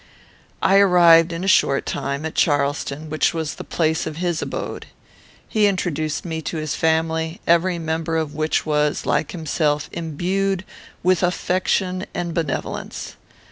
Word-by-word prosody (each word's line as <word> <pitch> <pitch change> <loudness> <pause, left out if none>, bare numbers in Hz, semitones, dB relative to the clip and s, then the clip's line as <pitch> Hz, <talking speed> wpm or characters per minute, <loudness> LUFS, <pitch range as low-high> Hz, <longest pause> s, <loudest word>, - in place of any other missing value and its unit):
I 195 - +5
arrived, 175 -3 +6
in 170 +2 -4
a - - -2
short 140 -7 +3
time, 140 +2 -3
at 160 - -4
Charleston, 145 0 0
which 155 +2 +1
was 160 -2 -2
the - - -8
place 160 -1 0
of 155 -1 -6
his 175 -2 -1
abode. - - -5 0.6
"He 215 -2 +3
introduced 155 -6 -2
me 160 -2 -3
to 160 - -4
his 155 -2 -2
family, 160 +1 0
every 170 +1 +3
member 165 0 -2
of 155 -2 -2
which 155 +1 0
was, 150 -1 0
like 155 - +1
himself, 150 -3 -1
imbued 185 +4 -1 0.4
with 185 -1 +3
affection 185 +1 0
and 175 -1 -2
benevolence. 160 -5 -4
165 Hz, 145 wpm, -21 LUFS, 155-180 Hz, 0.6 s, arrived